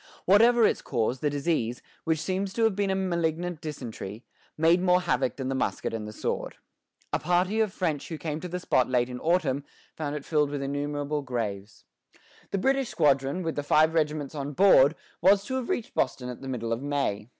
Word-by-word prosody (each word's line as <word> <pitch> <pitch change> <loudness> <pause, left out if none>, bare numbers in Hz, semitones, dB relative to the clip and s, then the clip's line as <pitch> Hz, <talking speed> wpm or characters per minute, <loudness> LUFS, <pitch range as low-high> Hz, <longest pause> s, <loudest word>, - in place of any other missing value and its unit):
Whatever 230 +4 +6
its - - +1
cause, 120 +3 -1
the 150 - +1
disease, 140 -5 -1 0.2
which 160 -1 +2
seems 190 +3 -2
to 230 - 0
have 220 -3 +3
been 200 0 0
a 190 - +1
malignant 170 -2 -1
dysentery, 120 -7 -7 0.3
made 165 +3 +4
more 180 0 +4
havoc 135 -8 0
than 130 -2 -4
the 135 - -1
musket 130 - -2
and 110 -1 -4
the - - -6
sword. - - -3 0.6
A - - +2
party 180 +5 +1
of 215 -3 +2
French 160 -7 -2
who 160 - -4
came 155 -1 -4
to 180 - -6
the 180 +1 -4
spot 130 -8 +2
late 125 -1 +1
in 125 - -5
the - - -11
autumn, 155 -5 +1 0.3
found 150 -2 -3
it 145 - -6
filled 150 -2 +2
with 145 -1 -3
innumerable 145 +1 -2
graves. 105 -6 -4 0.7
The - - -1
British 270 +4 +1
squadron, 140 +1 +2
with 165 -1 -2
the 145 - -1
five 155 +2 +3
regiments 150 -3 0
on 145 -1 -4
board, 160 -4 +6 0.3
was 195 +3 +5
to 260 - -3
have 255 - -4
reached 235 - -2
Boston 125 -2 -1
at 125 - -8
the 135 - -7
middle 115 -3 -2
of 115 - -3
May. 135 -7 -2
150 Hz, 205 wpm, -27 LUFS, 130-180 Hz, 0.7 s, Whatever